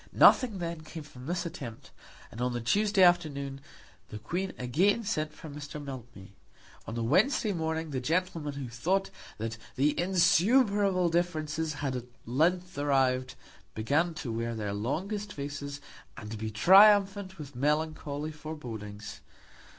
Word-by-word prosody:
Nothing 240 -7 +6
then 170 -2 -4
came 155 0 -8
from 130 -3 -12
this 175 +1 -1
attempt, 125 -9 -8 0.4
and 115 - -7
on 125 0 0
the 120 - -2
Tuesday 200 - +3
afternoon 140 -6 +2 0.5
the 105 - -6
Queen 175 - -3
again 185 - +2
sent 155 -8 -1
for - - -11
Mr. 150 0 -7
Mildmay. 120 -9 -9 0.6
On 115 - -5
the 115 - -2
Wednesday 210 - +2
morning 160 -2 -2
the 130 - -1
gentlemen 160 +1 -1
who 140 -2 -5
thought 180 +12 -1 0.3
that 115 +1 -4 0.2
the 145 +3 +3
insuperable 190 +2 +3
difficulties 160 -2 -1
had 140 -2 -3
at 125 -1 -4 0.2
length 175 +9 +1
arrived, 130 -3 +1 0.4
began 150 +10 +1
to 135 -7 -4
wear 115 +1 -2
their 105 -2 -3
longest 195 - -3
faces, 145 -1 -5 0.4
and 105 -2 -8
to 110 - -4
be 110 +1 -3
triumphant 195 - +5
with 145 -4 -9
melancholy 150 +1 -1
forebodings. 115 -10 -8
150 Hz, 145 wpm, -29 LUFS, 125-180 Hz, 0.6 s, Nothing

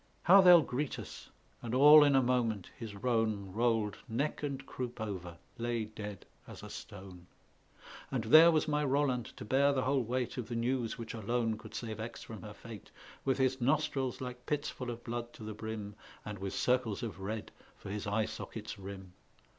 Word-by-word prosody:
"How 195 +4 +8
they'll 175 -3 +8
greet 130 +3 -3
us!" - - -9 0.3
and 120 +1 -3
all 150 +3 +9
in 145 -1 +4
a 135 - +5
moment 115 -6 0
his 110 -3 -7
roan 110 -3 -1
Rolled 115 -2 +1
neck 135 +7 -1
and 140 -2 -4
croup 125 -2 -6
over, 90 -5 -5 0.2
lay 120 -1 -1
dead 105 -2 -8 0.2
as - - -10
a - - -8
stone; 95 -3 -10 0.8
And 130 -4 -1
there 155 +9 +8
was 160 -2 +2
my 150 0 +1
Roland 135 -4 +1
to - - -7
bear 140 +5 +3
the 130 -2 0
whole 135 +2 +2
weight 125 +2 -2
Of 125 - -4
the 120 - -3
news 120 0 -1
which 115 -1 -6
alone 115 0 -1
could 110 - -11
save 110 -2 -5
Aix 115 +2 -6
from 110 - -9
her 105 -1 -9
fate, 115 -4 -11 0.3
With 135 -1 +1
his 130 -1 +1
nostrils 135 -1 0
like 125 -1 -7
pits 150 0 -1
full 125 -2 -6
of 120 0 -6
blood 120 0 -5
to - - -11
the 110 0 -5
brim, 105 -1 -6 0.3
And 105 -2 -6
with 95 0 -4
circles 125 -4 +1
of 110 -4 -5
red 105 +3 -5 0.3
for 100 - -8
his 105 0 -4
eye 105 +2 +1
sockets' - - -7
rim. 95 -1 -9
120 Hz, 195 wpm, -32 LUFS, 105-130 Hz, 0.8 s, all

